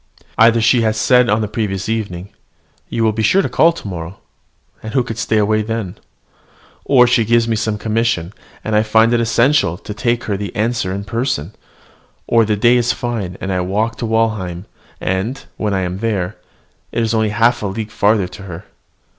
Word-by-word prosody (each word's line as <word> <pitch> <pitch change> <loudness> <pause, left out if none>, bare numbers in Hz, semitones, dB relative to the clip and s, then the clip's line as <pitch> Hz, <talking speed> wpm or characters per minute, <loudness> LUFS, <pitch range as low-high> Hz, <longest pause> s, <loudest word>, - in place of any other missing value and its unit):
Either 115 +1 +5
she 120 +2 +3
has 110 -1 0
said 125 +2 +4
on 105 +1 +2
the 105 - -1
previous 100 -3 -3
evening 100 -5 -3 0.6
"You 115 - -1
will 110 - +3
be 110 +1 -3
sure 190 - +3
to - - 0
call 165 - +4
to 165 - -9
morrow," 90 0 -6 0.6
and 110 +3 -7
who 130 - +3
could 115 -2 -6
stay 110 - 0
away 110 +1 +2
then? 110 -4 -4 0.9
or 125 -3 +6
she 120 -1 +3
gives 115 +1 +2
me 115 - +1
some 110 -1 -1
commission, 110 -5 -1 0.3
and 110 - -1
I 105 - +5
find 110 +2 +3
it 120 - +3
essential 115 - +2
to 105 +2 -8
take 120 +2 -1
her 100 -2 -2
the 100 -2 -6
answer 110 -3 -1
in 100 +1 -4
person; 110 - -2 0.7
or 115 -1 +3
the 105 0 +1
day 120 +4 +4
is 120 0 +1
fine, 110 -7 -4
and 95 0 -3
I 90 - 0
walk 105 +5 -1
to 115 - -3
Walheim; 110 -5 -1 0.3
and, 100 +9 -2
when 105 -2 -1
I 95 - 0
am 90 +1 -3
there, 105 -4 -2 0.6
it 115 - 0
is 115 0 0
only 110 -1 +1
half 115 +3 +2
a 105 - -2
league 105 +2 -5
farther 105 -3 +2
to 95 +3 -12
her. 90 -3 -9
110 Hz, 200 wpm, -17 LUFS, 100-115 Hz, 0.9 s, or